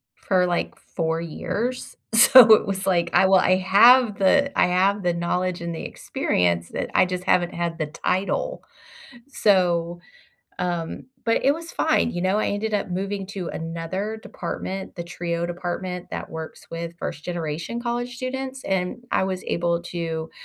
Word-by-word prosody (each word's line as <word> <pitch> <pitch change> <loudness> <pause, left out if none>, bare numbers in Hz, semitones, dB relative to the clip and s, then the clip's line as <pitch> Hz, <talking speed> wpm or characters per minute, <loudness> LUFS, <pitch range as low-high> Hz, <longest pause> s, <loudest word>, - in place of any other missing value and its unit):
for, 185 -2 +1
like, 175 -1 -2
4 165 -1 -3
years. 225 +9 -4 0.2
So, 230 0 +9
it 215 - +4
was 195 -1 -3
like, 170 -2 +2
I - - +5
well 190 -1 +5
I 185 - +3
have 210 +4 +6
the 280 +9 +2
I - - +5
have 190 +3 +2
the 175 -1 +1
knowledge 175 +1 -1
and 170 -1 -4
the - - -6
experience 85 -1 -1
that - - -4
I - - +6
just 180 0 -4
haven't 175 -2 +2
had 170 -1 -3
the 155 -2 -2
title. 200 - -2 0.7
So, 175 -7 +2 0.6
um, 175 +1 -3 0.2
but 230 - +1
it 275 - +5
was 335 +1 -9
fine, 315 -6 +2
you 175 - -4
know, 190 +3 +2
I - - 0
ended 210 +1 -2
up 200 - -1
moving 195 +2 -3
to 195 -3 -5
another 170 +7 -4
department, 190 0 -6
the 170 - -4
TRIO 170 0 -3
department 180 +1 -4
that - - -6
works 160 0 -8
with 165 0 -5
first-generation 165 +6 -4
college 245 +1 -3
students, 260 +1 -5
and 190 +4 -2
I - - +2
was 185 -1 -3
able 170 0 0
to, 165 -2 -4
185 Hz, 165 wpm, -23 LUFS, 170-210 Hz, 0.7 s, So